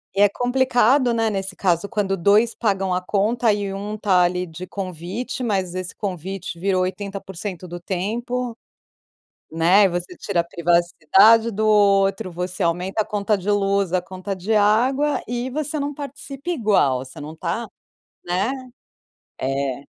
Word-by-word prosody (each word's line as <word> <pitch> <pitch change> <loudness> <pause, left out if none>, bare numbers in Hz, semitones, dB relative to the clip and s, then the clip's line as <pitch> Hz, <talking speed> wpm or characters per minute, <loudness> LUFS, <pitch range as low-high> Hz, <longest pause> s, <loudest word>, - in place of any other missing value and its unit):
E 200 - +2
é 205 - +7
complicado, 245 +1 +2
né, 225 -1 +1
nesse 195 -2 -4
caso 180 0 +1
quando 195 -3 -1
2 210 +6 +3
pagam 195 -4 0
a 180 - 0
conta 215 +5 +1
e 200 -1 -3
1 205 +2 -4
está 195 -4 +3
ali 180 +1 0
de 170 +1 -8
convite 195 - -5
mas 190 -6 -1
esse 185 -1 -4
convite 190 -2 -5
virou 185 0 +1
80% 190 -1 -5
do 175 0 -7
tempo, 230 +7 -3 1.0
né. 175 +5 +5
E 195 - +5
você 175 0 -4
tira 170 - -1
a 170 - -2
privacidade 175 +6 +4
do 215 +1 -1
outro, 195 -2 +3
você 180 +2 -4
aumenta 180 +5 0
a - - -11
conta 210 0 0
de 195 +3 -2
luz, 200 -2 +1
a 185 - +2
conta 185 +2 -6
de 190 +4 -3
água 255 +7 +2
e 245 +2 -3
você 305 +2 -3
não 285 0 -3
participa 280 +2 -7
igual, 200 - +2
você 130 - -12
não 150 +1 -7
está 180 +8 -3 0.6
né? 190 +7 0 0.9
É. 135 0 -2
195 Hz, 155 wpm, -22 LUFS, 180-225 Hz, 1.0 s, é